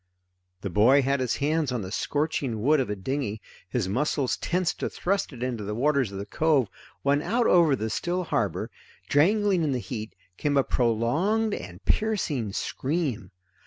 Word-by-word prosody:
The 100 - -4
boy 125 +9 +5
had 140 +1 +1
his 130 -2 0
hands 150 -1 0
on 120 -4 -2
the 95 - -7
scorching 135 -4 -1
wood 150 +3 +4
of 130 - -1
a 105 - -1
dinghy, 110 +1 -3 0.3
his 115 -4 -1
muscles 130 +5 0
tensed 180 0 -1
to - - -1
thrust 195 -1 -1
it 125 -3 -7
into 120 -4 -2
the 105 +1 -3
waters 135 -2 +1
of 100 - -6
the 100 - -4
cove, 140 -1 +2 0.3
when 140 +1 +3
out 235 +8 +1
over 170 -8 +5
the 110 -2 -3
still 180 +9 -1
harbor, 105 - -1 0.4
jangling 195 +5 +3
in 145 -3 +1
the - - 0
heat, 110 -2 -6 0.2
came 145 -1 +1
a 135 - +5
prolonged 145 - +1
and 90 - -7
piercing 170 - 0
scream. 130 - -2
135 Hz, 175 wpm, -26 LUFS, 110-160 Hz, 0.4 s, boy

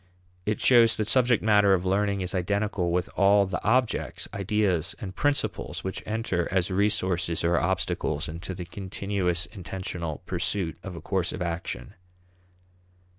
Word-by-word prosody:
It 105 - 0
shows 115 -3 +6
that 110 - -1
subject 125 -2 +3
matter 105 -2 +5
of 90 0 -3
learning 100 +1 +1
is 90 0 -3
identical 100 0 0
with 90 +1 0
all 100 +1 +5
the 95 -1 -4
objects, 120 +2 +1
ideas, 100 -4 0
and 95 -2 -6
principles 145 +4 -1
which 95 - -4
enter 105 -6 -1
as 95 0 +1
resources 95 -4 +1
or 85 +1 +3
obstacles 90 -4 -1
into 85 +4 -6
the 90 -1 -6
continuous 95 -1 -2
intentional 90 -4 -5
pursuit 90 -1 -2
of 95 -3 -7
a 85 - -8
course 95 -3 -1
of 90 - -3
action. 85 0 -4
95 Hz, 145 wpm, -27 LUFS, 90-105 Hz, -, shows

